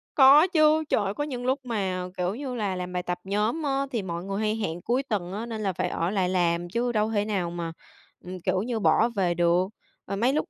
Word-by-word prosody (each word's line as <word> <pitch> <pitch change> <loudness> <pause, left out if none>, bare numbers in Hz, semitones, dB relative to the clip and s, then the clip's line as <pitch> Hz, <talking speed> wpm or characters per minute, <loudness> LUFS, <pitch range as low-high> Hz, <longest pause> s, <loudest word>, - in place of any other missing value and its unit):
Có 285 +4 +8
chứ. 315 -3 +4
Trời 205 - +2
ơi, 195 - -1
có 290 - -2
những 250 -4 -5
lúc 265 +2 +1
mà, 190 -6 -2
kiểu 180 +3 -1
như 260 -2 -5
là, 205 -4 -1
làm 180 0 -5
bài 180 0 -2
tập 180 0 -3
nhóm 210 +10 -1
á 275 -1 0
thì 230 -4 -1
mọi 170 -1 -5
người 195 +1 -3
hay 215 0 0
hẹn 175 -6 -3
cuối 255 +3 0
tuần 190 -8 -3
á, 215 +4 -4
nên 225 -2 -5
là 190 -2 0
phải - - -1
ở 170 +2 -1
lại 190 -3 0
làm 175 -1 +1
chứ 240 +5 0
đâu 215 0 +1
thể 205 -2 +1
nào 195 -5 -1
mà, 170 -1 -4 0.5
ừm, 180 -1 -7
kiểu 185 - 0
như, 230 +1 -2
bỏ 230 +3 +4
về 190 -6 0
được, 175 +2 +2 0.4
ờ, 200 - -3
mấy 240 +6 +2
lúc 305 - -1
205 Hz, 250 wpm, -26 LUFS, 180-245 Hz, 0.5 s, Có